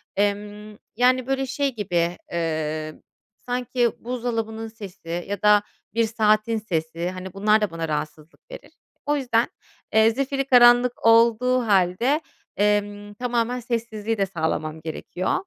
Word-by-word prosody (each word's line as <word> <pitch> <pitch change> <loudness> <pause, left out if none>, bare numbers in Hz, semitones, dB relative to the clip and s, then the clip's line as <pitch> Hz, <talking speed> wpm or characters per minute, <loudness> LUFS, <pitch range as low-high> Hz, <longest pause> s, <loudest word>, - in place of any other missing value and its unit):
Emm, 205 +1 -2 0.2
yani, 255 +1 +3
böyle 270 0 0
şey 275 -1 -1
gibi, 175 -4 -1
emm, 155 -2 -3 0.5
sanki 245 -1 0
buzdolabının 225 -2 -3
sesi 185 -6 -7
ya 205 0 -3
da 210 -1 +5 0.3
bir 230 0 +2
saatin 215 0 +2
sesi, 170 -4 -3
hani, 185 0 -7
bunlar 210 +2 +3
da 205 -5 0
bana 165 -1 -4
rahatsızlık 150 +1 -5
verir. - - -11 0.3
O 295 0 +1
yüzden, 240 -3 +1 0.5
eee, 220 +1 +5
zifirî 275 +2 -1
karanlık 245 -2 +5
olduğu 235 +2 +4
hâlde, 200 - +2 0.4
emm, 205 0 0
tamamen 245 +1 -1
sessizliği 225 -2 -3
de 195 - +2
sağlamam 160 -3 -3
gerekiyor. 165 +3 -3
215 Hz, 130 wpm, -23 LUFS, 185-240 Hz, 0.5 s, da